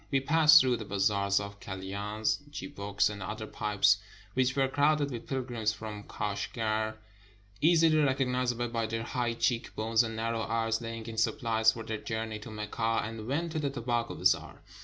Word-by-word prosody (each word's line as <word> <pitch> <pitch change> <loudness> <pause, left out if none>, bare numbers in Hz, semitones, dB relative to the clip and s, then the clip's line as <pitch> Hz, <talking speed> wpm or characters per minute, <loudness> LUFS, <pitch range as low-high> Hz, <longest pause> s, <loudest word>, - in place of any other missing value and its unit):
We 135 - +2
passed 155 +2 +7
through 125 -3 +2
the 110 - -7
bazaars 100 0 +1
of 100 0 -7
kalyans, 100 +3 -2
chibouks, 100 -9 -1
and 105 -1 -5
other 110 +3 -5
pipes, 105 -1 +2 0.4
which 130 0 +1
were 135 -1 +3
crowded 145 +1 +2
with 120 -2 -6
pilgrims 120 -5 -1
from 105 -1 -7
Kashgar, 110 +1 -2 0.7
easily 160 -1 +5
recognizable 125 -4 +1
by 115 -1 -1
their 115 0 -3
high 120 -1 -1
cheek 115 0 -1
bones 110 +1 +2
and 115 -1 -3
narrow 115 0 -1
eyes, 115 0 0
la5dng 115 -1 -6
in 115 -1 -7
supplies 110 0 +2
for 115 - -7
their 110 -1 -4
journey 110 -1 -4
to 110 - -9
Mecca, 110 +1 -1
and 110 0 -6
went 160 +6 -1
to 160 - -2
the 145 -2 0
Tobacco 120 -2 -2
Bazaar. 90 +1 +1
115 Hz, 170 wpm, -30 LUFS, 105-125 Hz, 0.7 s, passed